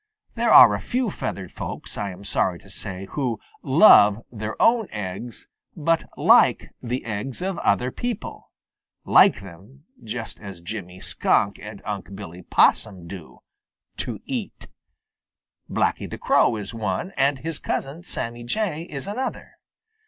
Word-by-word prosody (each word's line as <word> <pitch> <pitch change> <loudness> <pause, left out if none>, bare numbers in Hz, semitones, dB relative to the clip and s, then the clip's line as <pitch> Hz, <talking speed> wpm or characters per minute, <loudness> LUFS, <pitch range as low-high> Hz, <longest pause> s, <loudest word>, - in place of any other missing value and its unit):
There - - 0
are - - +9
a - - -1
few 250 -4 -1
feathered 95 - -5
folks, - - -7
I 100 - -3
am 95 +2 -10
sorry 90 -2 0
to 100 - -15
say, 95 -2 -5
who 125 -7 -2 0.2
"love" 120 - +6
their 110 -2 -6
own 230 -3 +4
eggs, 105 +3 -6 0.3
but 165 +1 0
"like" - - +4
the 125 +2 -3
eggs 110 +3 -4
of 190 -1 -2
other 125 +6 +1
people 240 - -5 0.6
like 105 - +6
them 100 +10 -14 0.2
just 115 +1 -6
as 100 -4 -9
Jimmy 90 0 -7
Skunk 100 +1 +1
and 105 -1 -10
Unc' 100 -2 -5
Billy 90 -3 -9
Possum 90 0 +2
do, 85 -3 -10 0.6
to - - -4
eat. - - -5 1.0
Blacky - - 0
the - - -6
Crow - - +3
is 105 -1 -6
one 110 - -3
and 140 -3 +1
his 160 +3 -5
cousin, 145 +6 -3
Sammy 120 -8 -4
Jay, 170 - -2
is 140 -2 -5
another. 240 +7 -4
110 Hz, 145 wpm, -23 LUFS, 100-145 Hz, 1.0 s, are